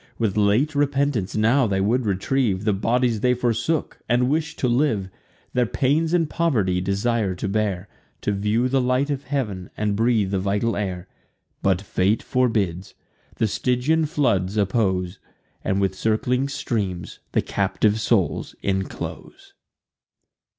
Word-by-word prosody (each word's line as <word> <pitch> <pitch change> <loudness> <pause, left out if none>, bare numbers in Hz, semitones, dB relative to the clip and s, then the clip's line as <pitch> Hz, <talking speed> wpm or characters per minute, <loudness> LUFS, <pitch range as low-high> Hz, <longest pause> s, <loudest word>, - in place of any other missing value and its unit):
With 110 -4 0
late 105 +9 +2
repentance 140 -7 0
now 115 +4 +3
they 95 -2 0
would 115 +4 +1
retrieve 100 +1 0
The 105 - +3
bodies 115 +3 +1
they 125 +3 +2
forsook, 120 +6 -1
and 125 +2 +2
wish 155 +1 -1
to 125 - 0
live; 120 -7 +1 0.4
Their 125 -1 +2
pains 150 +8 +1
and 170 -2 +2
poverty 115 - +1
desire 100 +1 0
to 95 - -3
bear, 100 -2 -1 0.3
To - - 0
view 105 +5 +1
the 135 +1 +2
light 130 +3 +1
of 140 -1 -3
heav'n, 110 -10 -3
and 105 -1 0
breathe 110 -3 +2
the 95 - +1
vital 100 +4 0
air: 95 -3 -3 0.5
But 95 -1 +2
fate 100 +2 +1
forbids; 105 -8 0 0.4
the 110 - +1
Stygian 125 +9 +1
floods 110 - 0
oppose, 95 -3 0 0.4
And 95 0 0
with 95 -1 +1
circling 125 +7 0
streams 100 -9 -3
the - - +2
captive 105 +2 0
souls 105 -5 0
inclose. 95 -1 -4
110 Hz, 140 wpm, -23 LUFS, 100-125 Hz, 0.5 s, now